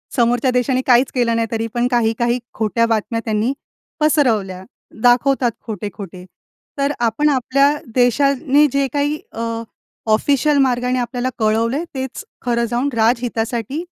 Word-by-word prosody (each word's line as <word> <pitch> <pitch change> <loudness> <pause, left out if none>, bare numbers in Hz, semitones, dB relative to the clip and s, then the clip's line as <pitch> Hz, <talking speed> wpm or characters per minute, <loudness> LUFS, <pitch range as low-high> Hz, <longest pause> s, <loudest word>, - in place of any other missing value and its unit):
समोरच्या 245 +1 +2
देशाने 250 +1 +1
काहीच 250 +1 +4
केलं 235 -2 +1
नाही, 230 0 0
तरी 225 0 -1
पण 240 +1 +1
काही-काही 235 +1 +1
खोट्या 225 +1 +1
बातम्या 225 +1 -1
त्यांनी 220 +4 0 0.5
पसरवल्या, 225 -12 +1 0.4
दाखवतात 245 +1 +3 0.2
खोटे-खोटे. 195 -3 -7 0.5
तर 280 0 +1
आपण 240 +6 +1
आपल्या 275 +1 +2 0.2
देशाने 275 +3 +3
जे 275 0 +1
काही 290 +1 0
अ, 230 - -6 0.7
ऑफिशियल 285 +6 +2
मार्गाने 250 -1 +1
आपल्याला 245 +1 -2
कळवलंय, 230 +7 +1
तेच 265 -1 -5 0.2
खरं 235 -1 0
जाऊन 240 +4 -1
राजहितासाठी 235 - -1
245 Hz, 125 wpm, -19 LUFS, 230-270 Hz, 0.7 s, काहीच